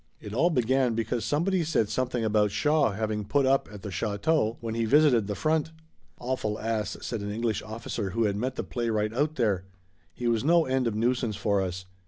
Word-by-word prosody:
It 105 Hz, -1 st, -8 dB
all 165 Hz, +9 st, +3 dB
began 130 Hz, -4 st, +2 dB
because 115 Hz, 0 st, -1 dB
somebody 175 Hz, +4 st, +1 dB
said 150 Hz, -9 st, +1 dB
something 125 Hz, 0 st, -1 dB
about 105 Hz, -1 st, +3 dB
Shaw 150 Hz, +10 st, +2 dB
having 105 Hz, 0 st, -2 dB
put 135 Hz, +7 st, +1 dB
up 135 Hz, +1 st, +2 dB
at 105 Hz, -1 st, -10 dB
the 105 Hz, -, -5 dB
château 110 Hz, -, 0 dB
when 115 Hz, -2 st, -4 dB
he 115 Hz, 0 st, 0 dB
visited 125 Hz, -4 st, +4 dB
the 105 Hz, -, -2 dB
front. 155 Hz, +3 st, 0 dB, 0.5 s
"Awful 120 Hz, -4 st, -2 dB
ass," 110 Hz, -3 st, -2 dB
said 115 Hz, -3 st, -4 dB
an 100 Hz, 0 st, -4 dB
English 110 Hz, 0 st, -1 dB
officer 110 Hz, -2 st, -4 dB
who 115 Hz, +5 st, 0 dB
had 100 Hz, -2 st, +1 dB
met 125 Hz, +5 st, -2 dB
the -, -, -3 dB
playwright 110 Hz, -3 st, -1 dB
out 145 Hz, +5 st, 0 dB
there. 100 Hz, -, 0 dB, 0.5 s
"He 120 Hz, -, -3 dB
was 115 Hz, -1 st, +1 dB
no 165 Hz, +2 st, +4 dB
end 130 Hz, -1 st, 0 dB
of 110 Hz, -, -1 dB
nuisance 120 Hz, 0 st, 0 dB
for 100 Hz, -1 st, +1 dB
us. 90 Hz, 0 st, -4 dB
115 Hz, 205 wpm, -27 LUFS, 105-130 Hz, 0.5 s, visited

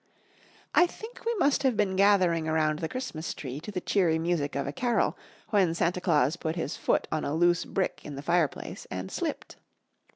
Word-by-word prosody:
I 355 Hz, -, +6 dB
think 445 Hz, +7 st, -11 dB
we 470 Hz, -, +1 dB
must 285 Hz, -8 st, +2 dB
have 260 Hz, -5 st, +2 dB
been 195 Hz, -2 st, +1 dB
gathering 185 Hz, -5 st, +4 dB
around 155 Hz, -1 st, +1 dB
the 160 Hz, -, -3 dB
Christmas 170 Hz, -11 st, -4 dB
tree 135 Hz, 0 st, -6 dB
to 210 Hz, -, -8 dB
the 190 Hz, -, -2 dB
cheery 180 Hz, -4 st, +2 dB
music 160 Hz, -3 st, -1 dB
of 140 Hz, -1 st, -1 dB
a 140 Hz, -, -3 dB
carol 240 Hz, -, +1 dB, 0.4 s
when 190 Hz, -6 st, +3 dB
Santa 175 Hz, +2 st, 0 dB
Claus 155 Hz, -3 st, +2 dB
put 160 Hz, -1 st, -3 dB
his 165 Hz, -4 st, -3 dB
foot -, -, 0 dB
on 155 Hz, -, -1 dB
a 145 Hz, -, -1 dB
loose 175 Hz, +1 st, +3 dB
brick 190 Hz, -, -2 dB
in 145 Hz, -, -7 dB
the 140 Hz, -, -7 dB
fireplace 170 Hz, -2 st, -1 dB
and 95 Hz, +1 st, -5 dB
slipped. -, -, -4 dB
170 Hz, 195 wpm, -28 LUFS, 155-200 Hz, 0.4 s, I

